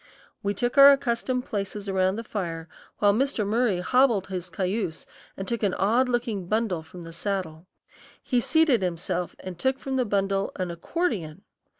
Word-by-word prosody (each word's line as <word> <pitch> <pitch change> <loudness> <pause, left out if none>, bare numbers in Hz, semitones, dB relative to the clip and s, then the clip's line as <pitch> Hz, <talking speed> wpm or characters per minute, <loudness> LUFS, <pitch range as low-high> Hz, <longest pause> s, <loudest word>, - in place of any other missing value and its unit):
We 200 0 -1
took 245 +5 0
our 280 0 +11
accustomed 250 -2 0
places 200 0 -4
around 190 0 +1
the 230 - -5
fire, 170 -7 -4 0.3
while 205 -1 +4
Mr. 255 -2 0
Murry 210 -3 +1
hobbled 235 -3 +3
his 185 -1 -4
cayuse 180 -3 -2 0.3
and 195 - -5
took 235 -2 -2
an 200 -4 +1
odd 240 +6 +2
looking 235 -7 -1
bundle 215 -5 0
from 165 +3 -11
his 165 0 -9
saddle. 180 -5 -3 0.6
He 245 -2 +1
seated 310 -5 +3
himself 180 0 -2
and 185 -2 -8
took 265 0 +1
from 270 -1 -3
the 255 - +2
bundle 195 -1 0
an 185 -2 -3
accordion! 180 - -3
200 Hz, 170 wpm, -26 LUFS, 180-240 Hz, 0.6 s, our